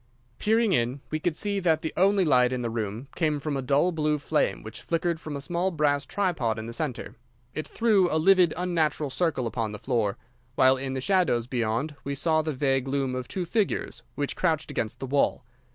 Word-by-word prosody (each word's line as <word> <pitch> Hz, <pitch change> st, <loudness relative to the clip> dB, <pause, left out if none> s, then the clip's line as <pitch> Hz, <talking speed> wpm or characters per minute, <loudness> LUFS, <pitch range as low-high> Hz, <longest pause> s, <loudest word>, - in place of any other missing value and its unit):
Peering 220 Hz, 0 st, +2 dB
in, 125 Hz, -3 st, +1 dB
we 155 Hz, -, -1 dB
could 160 Hz, 0 st, -1 dB
see 200 Hz, -1 st, 0 dB
that 165 Hz, -4 st, +2 dB
the 160 Hz, -, -4 dB
only 195 Hz, 0 st, +3 dB
light 125 Hz, -4 st, +4 dB
in 125 Hz, -1 st, -2 dB
the 115 Hz, -, -2 dB
room 110 Hz, +3 st, -4 dB
came 155 Hz, -3 st, 0 dB
from 145 Hz, 0 st, -3 dB
a 135 Hz, -, -1 dB
dull 140 Hz, +7 st, +2 dB
blue 155 Hz, -2 st, 0 dB
flame 150 Hz, +1 st, 0 dB
which 110 Hz, -, -8 dB
flickered 170 Hz, 0 st, -1 dB
from 155 Hz, -2 st, -6 dB
a -, -, -3 dB
small 175 Hz, +5 st, -1 dB
brass 145 Hz, -5 st, +1 dB
tripod 160 Hz, -, 0 dB
in 110 Hz, -, -5 dB
the 115 Hz, -, -6 dB
centre. 140 Hz, -1 st, -4 dB, 0.4 s
It 155 Hz, -, -4 dB
threw 210 Hz, -6 st, +3 dB
a 155 Hz, -, +2 dB
livid, 180 Hz, 0 st, +5 dB
unnatural 160 Hz, -5 st, 0 dB
circle 160 Hz, -4 st, 0 dB
upon 115 Hz, -2 st, -2 dB
the -, -, -5 dB
floor, 110 Hz, -5 st, -1 dB, 0.4 s
while 130 Hz, 0 st, +5 dB
in 130 Hz, 0 st, -4 dB
the 130 Hz, -, -3 dB
shadows 175 Hz, -9 st, +2 dB
beyond 120 Hz, +4 st, -1 dB
we 140 Hz, 0 st, -3 dB
saw 155 Hz, +2 st, +2 dB
the 155 Hz, 0 st, -2 dB
vague 135 Hz, -1 st, 0 dB
loom 135 Hz, -1 st, -1 dB
of 125 Hz, -1 st, -4 dB
two 185 Hz, -3 st, -3 dB
figures 205 Hz, +3 st, -1 dB
which 145 Hz, -1 st, -2 dB
crouched 160 Hz, -4 st, 0 dB
against 110 Hz, -, -3 dB
the -, -, -4 dB
wall. 135 Hz, -1 st, +1 dB
150 Hz, 210 wpm, -26 LUFS, 130-170 Hz, 0.4 s, livid